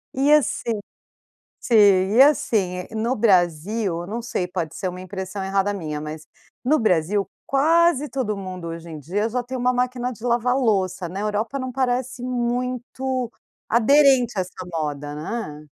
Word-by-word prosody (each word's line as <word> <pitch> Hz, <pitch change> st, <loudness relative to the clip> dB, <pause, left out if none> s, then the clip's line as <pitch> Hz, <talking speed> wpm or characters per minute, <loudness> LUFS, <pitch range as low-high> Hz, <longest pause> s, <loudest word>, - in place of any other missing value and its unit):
E 275 Hz, +3 st, +3 dB
assim 250 Hz, -6 st, +2 dB, 0.8 s
sim, 235 Hz, -, 0 dB, 0.4 s
e 255 Hz, -, +8 dB
assim, 220 Hz, -10 st, +3 dB
eh, 180 Hz, -, -7 dB
no 230 Hz, +4 st, 0 dB
Brasil, 185 Hz, -2 st, +1 dB
eu 175 Hz, -, -8 dB
não 225 Hz, +4 st, -4 dB
sei, 230 Hz, -6 st, -2 dB
pode 175 Hz, -3 st, -4 dB
ser 185 Hz, -, -2 dB
uma 180 Hz, 0 st, -8 dB
impressão 190 Hz, +1 st, -5 dB
errada 195 Hz, +1 st, 0 dB
minha, 155 Hz, -6 st, -4 dB
mas 155 Hz, +1 st, -7 dB, 0.4 s
no 290 Hz, +5 st, +3 dB
Brasil, 195 Hz, -, +1 dB, 0.2 s
quase 305 Hz, +1 st, +3 dB
todo 245 Hz, -6 st, -2 dB
mundo 185 Hz, -3 st, -6 dB
hoje 165 Hz, 0 st, -7 dB
em 155 Hz, -2 st, -7 dB
dia 200 Hz, -, -1 dB
já 250 Hz, +2 st, -1 dB
tem 255 Hz, +2 st, -5 dB
uma 250 Hz, 0 st, +2 dB
máquina 250 Hz, 0 st, -1 dB
de 225 Hz, -2 st, -12 dB
lava-louça, 230 Hz, -7 st, +1 dB
na 190 Hz, +3 st, -5 dB
Europa 215 Hz, +5 st, -1 dB
não 260 Hz, -1 st, -4 dB
parece 255 Hz, -1 st, -1 dB
muito 250 Hz, 0 st, -2 dB, 0.4 s
aderente 250 Hz, 0 st, +4 dB
a -, -, +3 dB
essa 185 Hz, 0 st, -8 dB
moda, 145 Hz, -2 st, -3 dB
né. 155 Hz, -2 st, -5 dB
220 Hz, 160 wpm, -23 LUFS, 180-250 Hz, 0.8 s, e